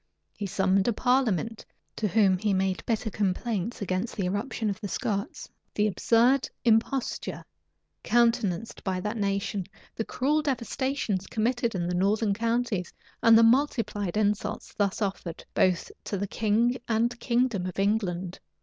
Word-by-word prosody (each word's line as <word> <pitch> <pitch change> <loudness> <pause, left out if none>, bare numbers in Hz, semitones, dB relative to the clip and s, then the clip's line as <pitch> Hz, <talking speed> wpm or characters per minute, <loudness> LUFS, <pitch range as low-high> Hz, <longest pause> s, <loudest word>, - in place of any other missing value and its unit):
He 205 - -4
summoned 190 +1 +2
a 240 - +3
parliament, 225 - +1 0.3
to 215 - 0
whom 195 -3 +3
he 205 -1 +1
made 190 0 0
bitter 220 -1 -1
complaints 210 +2 -1
against 185 +4 -2
the 195 - -1
irruption 205 +4 -2
of 205 +1 -3
the 205 - -3
Scots, 200 +1 -3 0.3
the 210 - +2
absurd 235 +6 +3 0.2
imposture 235 +3 +1 0.6
countenanced 230 -4 +1
by 190 -2 -1
that 210 +4 -3
nation, 200 -1 -1 0.3
the 225 - -1
cruel 290 +7 0
devastations 260 -6 -2
committed 235 0 0
in 175 -2 -1
the 180 - -1
northern 200 +3 +2
counties, 230 -3 -1 0.3
and 225 0 +7
the 230 - +6
multiplied 225 -6 +2
insults 210 -1 -1
thus 205 +1 0
offered 190 -4 -4
both 185 -2 +2
to 200 - -2
the 200 - -1
king 225 +4 +1
and 235 +1 +1
kingdom 235 -6 +1
of 185 - -7
England. 190 -3 -1
215 Hz, 145 wpm, -27 LUFS, 195-235 Hz, 0.6 s, and